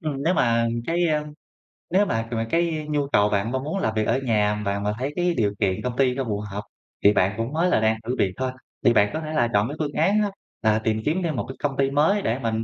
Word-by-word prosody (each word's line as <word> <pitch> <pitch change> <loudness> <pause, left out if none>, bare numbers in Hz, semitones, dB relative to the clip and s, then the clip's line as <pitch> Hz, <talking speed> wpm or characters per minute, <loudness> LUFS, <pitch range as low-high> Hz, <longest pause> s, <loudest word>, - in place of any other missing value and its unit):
Ừm, 145 -4 -3
nếu 175 +4 +2
mà 115 -1 +2 0.2
cái, 170 +1 +1
a 150 -1 0 0.7
nếu 195 +4 +3
mà 115 - -1
mà 115 -1 -1
cái 165 -2 0
nhu 145 -2 0
cầu 105 -6 +3
bạn 100 +2 0
mong 130 +1 -2
muốn 160 +7 -2
làm 110 -10 -1
việc 110 -1 0
ở 125 +3 +2
nhà 105 -3 +1
bạn 100 0 -1
mà 105 0 0
thấy 140 +3 -2
cái 175 0 +1
điều 105 -3 +1
kiện 95 -3 0
công 125 -1 -2
ty 130 -2 +3
cho 135 - -1
phù 105 -3 -2
hợp 100 +1 -4 0.4
thì 100 - +6
bạn 95 +1 +2
cũng 115 +5 -3
mới 170 +3 +2
là - - +3
đang 110 0 +2
thử 125 - -1
việc 95 -2 +2
thôi, 130 0 -1 0.3
thì 120 - +6
bạn 105 -2 +4
có 155 - -2
thể 155 0 -5
là 120 -6 +2
chọn 105 +2 +3
cái 145 - -5
phương 145 -2 -2
án 200 +7 +2
á 205 - +1 0.3
là 110 0 +3
tìm 110 0 -1
kiếm 165 +5 +1
thêm 160 -4 -1
một - - -2
cái 130 - -6
công 140 -2 -1
ty 135 0 +2
mới 160 +9 +3
để 120 -4 -1
mình, 115 -3 -1
125 Hz, 280 wpm, -24 LUFS, 110-155 Hz, 0.7 s, thì